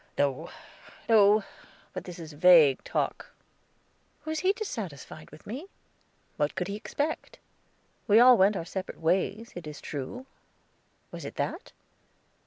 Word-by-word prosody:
"No, 145 +3 0 0.6
no; 215 -1 +5 0.5
but - - -6
this 180 -2 -8
is 160 -3 -9
vague 155 -3 +6
talk." - - -3 0.9
Was 315 0 -2
he 370 +4 +3
dissatisfied 200 - -7
with 150 - -15
me? 265 - -7 0.7
What 145 0 0
could 180 -2 -2
he 200 - -4
expect? 290 +8 -4 0.7
We 215 +1 +6
all 250 +1 +8
went 200 -1 +4
our 165 - -4
separate 190 +2 -6
ways, 195 +7 0
it 175 -3 -8
is 150 - -8
true; 150 - -6 0.9
was - - -8
it - - -7
that? - - -4
190 Hz, 135 wpm, -28 LUFS, 155-230 Hz, 0.9 s, all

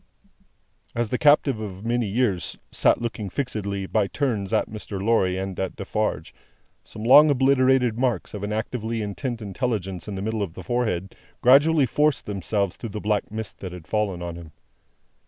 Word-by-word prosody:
As 120 -2 0
the 125 - -1
captive 145 -5 +4
of 100 -1 -7
many 120 -1 0
years 100 -4 0
sat - - +3
looking 115 -4 -4
fixedly, 100 -5 -3
by 105 +1 +1
turns, 110 -7 -2
at - - +2
Mr. 105 -2 -6
Lorry 95 -3 +2
and 95 -1 -4
at 95 - -2
Defarge, - - -2 0.5
some 110 - -9
long 145 +6 +8
obliterated 130 -3 +3
marks 125 -7 -1
of 105 - -5
an 105 +1 -3
actively 110 0 -2
intent 115 +3 -4
intelligence 95 -4 -3
in 105 - -4
the 95 - -4
middle 110 0 -2
of 90 -4 -4
the 95 - -8
forehead, 100 -3 -1 0.3
gradually 145 +4 +6
forced 150 +2 +1
themselves 100 -1 -2
through 115 - -6
the 105 +1 -5
black 105 0 -1
mist 110 -1 -6
that 95 -2 -6
had 90 -3 -10
fallen 100 -3 -1
on 85 -1 -5
him. 80 -3 -11
110 Hz, 175 wpm, -24 LUFS, 95-125 Hz, 0.5 s, long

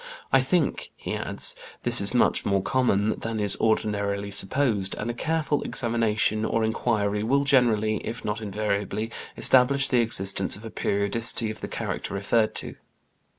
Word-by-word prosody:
I - - +6
think," - - 0
he - - -5
adds, - - -3 0.3
"this 120 -2 +3
is 100 - +2
much 125 - +2
more 100 -1 +1
common 110 -5 +1
than 115 -1 -4
is 105 -2 +4
ordinarily 100 -2 0
supposed, 100 -1 0
and 115 +3 -3
a - - -6
careful 155 +2 -1
examination 110 -2 0
or 115 0 0
inquiry 105 -2 0
will 135 +6 +2
generally, 115 -6 +3
if 115 +3 -6
not 105 +2 -2
invariably, 105 +1 -2 0.3
establish 135 +2 +4
the 125 - +3
existence 95 -4 0
of 105 - -11
a 110 - -7
periodicity 110 +3 0
of 110 - -10
the - - -4
character - - -4
referred 110 +3 +1
to." - - -5
110 Hz, 155 wpm, -25 LUFS, 100-120 Hz, 0.3 s, I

